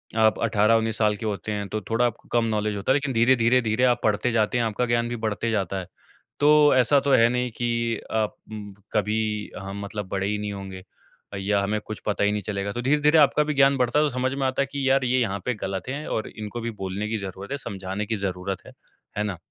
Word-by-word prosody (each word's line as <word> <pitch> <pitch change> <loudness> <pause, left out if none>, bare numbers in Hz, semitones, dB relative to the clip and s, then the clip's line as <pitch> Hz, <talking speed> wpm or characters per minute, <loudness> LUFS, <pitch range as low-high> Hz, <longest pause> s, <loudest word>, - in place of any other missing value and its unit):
आप 110 -1 +3
18-19 110 0 +2
साल 105 -1 +2
के 110 - -6
होते 105 0 -3
हैं 100 -1 -3
तो 110 - -2
थोड़ा 115 +2 +2
आपको 115 -1 -4
कम 120 -1 +2
नॉलेज 105 -1 -1
होता 100 +5 -1
है - - +6
लेकिन 145 -2 -1
धीरे-धीरे, 120 +1 +4
धीरे 110 +2 0
आप 125 -1 +4
पढ़ते 110 +3 +1
जाते 110 +1 +1
हैं, 120 - +1
आपका 110 +3 -1
ज्ञान 120 0 +1
भी 120 - -3
बढ़ते 110 +1 -1
जाता 95 -3 -1
है। 95 - -6 0.5
तो 150 -1 +6
ऐसा 130 +3 +5
तो 140 - 0
है 115 -2 +6
नहीं 125 0 -1
कि 115 -1 -1
आप 110 -1 0 0.6
कभी 105 +1 +1 0.4
हम 95 +1 -6
मतलब 105 -1 -5
बड़े 95 0 -1
ही 105 - 0
नहीं 105 0 -4
होंगे 95 -1 -8 0.6
या 100 +1 +1
हमें 105 +2 0
कुछ 110 - -7
पता 105 -1 0
ही 100 - +3
नहीं 105 0 -1
चलेगा। 100 0 -3
तो 120 - -3
धीरे-धीरे 150 +4 +3
आपका 150 0 +5
भी 150 0 -2
ज्ञान 135 -1 +4
बढ़ता 125 +3 +2
है 155 - +4
तो 150 - +1
समझ 130 +1 0
में 135 -1 -1
आता 130 +1 0
है - - +2
कि 140 -2 -1
यार 135 0 +3
ये 130 +1 +2
यहाँ 100 -4 -1
पे 125 - +1
ग़लत 95 +1 -3
है 145 +3 -4
और 110 - -2
इनको 110 +2 -6
भी 115 +1 -3
बोलने 95 +3 -3
की 115 - -1
ज़रूरत 100 +1 -7
है, 140 - -1
समझाने 95 -4 -4
की 110 - -1
ज़रूरत 95 -1 -3
है। - - -11 0.5
है 105 - +1
ना? 100 -4 -3
110 Hz, 245 wpm, -25 LUFS, 100-125 Hz, 0.6 s, है